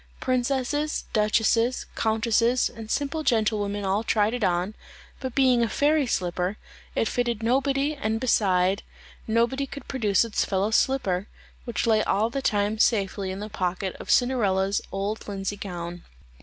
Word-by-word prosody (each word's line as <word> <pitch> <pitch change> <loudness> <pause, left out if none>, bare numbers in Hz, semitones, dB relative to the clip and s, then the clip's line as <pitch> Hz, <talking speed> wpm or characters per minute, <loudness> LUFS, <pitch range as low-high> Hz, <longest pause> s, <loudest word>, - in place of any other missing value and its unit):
Princesses, 265 +4 0
duchesses, 225 +3 +2
countesses, 230 +2 +2
and 225 -2 -10
simple 285 +5 -1
gentlewomen 210 -5 0
all 195 +3 +1
tried 215 0 +2
it 245 -3 -2
on, 180 +2 +1 0.5
but 260 -3 -5
being 260 -3 +4
a 230 - +1
fairy 295 +1 +2
slipper, 180 -1 -1 0.4
it 225 - +1
fitted 235 -2 -1
nobody 275 +4 +1
and 225 -6 -2
beside, 195 -5 +2 0.5
nobody 235 +5 +1
could 280 - -9
produce 220 -5 +2
its 225 - 0
fellow 195 +2 0
slipper, 210 -6 +1 0.4
which 235 0 -2
lay 220 -2 +4
all 220 +4 +1
the 275 - -2
time 210 -2 0
safely 200 -4 +1
in 190 +2 -5
the 210 - -4
pocket 190 -2 -2
of - - -9
Cinderella's 205 -6 +2
old 200 +3 -2
linsey 195 0 -3
gown. 175 -3 -6
220 Hz, 145 wpm, -25 LUFS, 200-250 Hz, 0.5 s, being